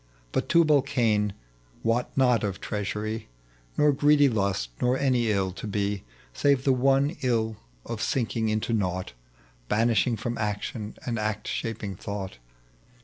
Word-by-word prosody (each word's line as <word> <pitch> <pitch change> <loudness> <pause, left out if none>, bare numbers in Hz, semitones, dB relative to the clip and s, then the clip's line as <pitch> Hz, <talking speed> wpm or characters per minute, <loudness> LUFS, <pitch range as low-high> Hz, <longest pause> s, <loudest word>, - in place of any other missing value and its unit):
Eut - - 0
Tubal 155 -4 +5
Cain 110 -7 +1 0.5
wot 115 +2 +1
not 125 -3 +4
of 100 -2 -2
treachery, 105 +2 -3 0.5
Nor 150 0 +5
greedy 145 +1 +5
lust, 100 - 0
nor 125 +1 +3
any 125 -4 +2
iU 95 -3 +1
to 110 - -7
be, 100 -1 -1 0.3
Save 140 - +2
the 135 - +4
one 135 +4 +3
ill 110 -4 0 0.3
of - - -4
sinking 115 -3 0
into 110 +2 -1
nought. 95 - -1 0.6
Banished 115 +2 +2
from 120 +3 -3
action 105 +1 -3
and 120 -2 -1
act^shaping 105 -1 -3
thought. 100 - -5
110 Hz, 135 wpm, -27 LUFS, 105-130 Hz, 0.6 s, Tubal